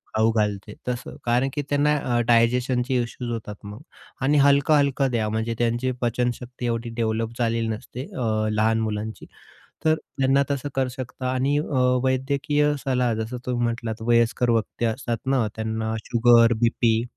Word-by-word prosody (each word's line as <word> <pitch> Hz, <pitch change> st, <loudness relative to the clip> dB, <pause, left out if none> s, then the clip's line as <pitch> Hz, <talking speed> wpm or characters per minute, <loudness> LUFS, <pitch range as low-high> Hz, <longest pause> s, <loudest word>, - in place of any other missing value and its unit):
खाऊ 110 Hz, +1 st, +3 dB
घालते, 105 Hz, -1 st, -1 dB
तसं. 125 Hz, -1 st, -4 dB
कारण 120 Hz, +3 st, +2 dB
की 145 Hz, -, -1 dB
त्यांना 145 Hz, +1 st, +2 dB, 0.2 s
अ, -, -, +2 dB
डायजेशनचे 125 Hz, +2 st, +2 dB
इश्यूज 120 Hz, 0 st, -6 dB
होतात 110 Hz, -2 st, -5 dB
मग. 105 Hz, +1 st, -8 dB, 0.4 s
आणि 145 Hz, +3 st, +3 dB
हलकं-हलकं 140 Hz, -1 st, +3 dB
द्या, 110 Hz, -3 st, 0 dB
म्हणजे 110 Hz, +2 st, -2 dB
त्यांची 120 Hz, +2 st, 0 dB
पचनशक्ती 125 Hz, +1 st, -2 dB
एवढी 115 Hz, 0 st, -2 dB
डेव्हलप 115 Hz, 0 st, -2 dB
झालेली 115 Hz, -1 st, 0 dB
नसते, 110 Hz, +3 st, -5 dB
अ, 110 Hz, -3 st, 0 dB
लहान 110 Hz, +1 st, +2 dB
मुलांची. 110 Hz, 0 st, -4 dB, 0.6 s
तर 155 Hz, 0 st, +5 dB
त्यांना 135 Hz, -3 st, 0 dB
तसं 140 Hz, 0 st, -2 dB
करू 135 Hz, -1 st, +1 dB
शकता. 130 Hz, 0 st, -5 dB
आणि 135 Hz, +3 st, +1 dB
अ, 150 Hz, -3 st, -1 dB, 0.2 s
वैद्यकीय 140 Hz, +3 st, +1 dB
सलाह, 125 Hz, -3 st, +1 dB
जसं 110 Hz, +3 st, -4 dB
तुम्ही 125 Hz, -1 st, -1 dB
म्हटलात, 115 Hz, -1 st, -3 dB
वयस्कर 120 Hz, +1 st, +2 dB
व्यक्ती 115 Hz, +1 st, -1 dB
असतात 115 Hz, 0 st, -2 dB
ना, 130 Hz, -4 st, +2 dB
त्यांना 110 Hz, 0 st, -2 dB
शुगर, 120 Hz, 0 st, +5 dB
बी-पी 115 Hz, -1 st, +2 dB
120 Hz, 150 wpm, -24 LUFS, 115-130 Hz, 0.6 s, तर